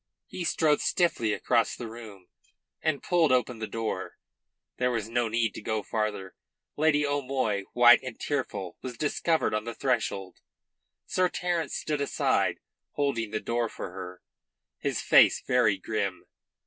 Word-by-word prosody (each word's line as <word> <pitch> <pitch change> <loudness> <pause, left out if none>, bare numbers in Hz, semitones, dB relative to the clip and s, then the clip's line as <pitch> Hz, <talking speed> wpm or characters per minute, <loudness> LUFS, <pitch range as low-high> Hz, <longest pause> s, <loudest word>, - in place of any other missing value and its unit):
He 180 - -6
strode 155 -2 +2
stiffly 170 - +1
across 115 +2 +1
the 120 - -6
room 110 -5 -11 0.6
and 155 -3 -1
pulled 170 -5 +3
open 125 -2 +1
the 110 - -3
door. 115 -1 -4 0.6
There 125 0 +1
was 115 -4 -2
no 120 0 0
need 115 -1 0
to - - -7
go 110 0 -2
farther. 105 -4 -3 0.4
Lady 150 -1 +3
O'Moy, 130 -8 -1
white 120 0 +7
and 130 -3 -8
tearful, 100 -11 -3
was 125 -2 -7
discovered 160 0 +1
on 105 +1 -1
the 115 - -5
threshold. 110 -7 -1 0.7
Sir 185 -1 +1
Terence 175 -4 -2
stood 150 -2 -2
aside, 140 - +1 0.4
holding 125 -6 -1
the 110 0 -2
door 115 0 -1
for 90 - -7
her, 90 -1 -8 0.6
his - - -1
face - - +6
very 120 -6 +3
grim. 95 - -3
120 Hz, 150 wpm, -28 LUFS, 110-145 Hz, 0.7 s, white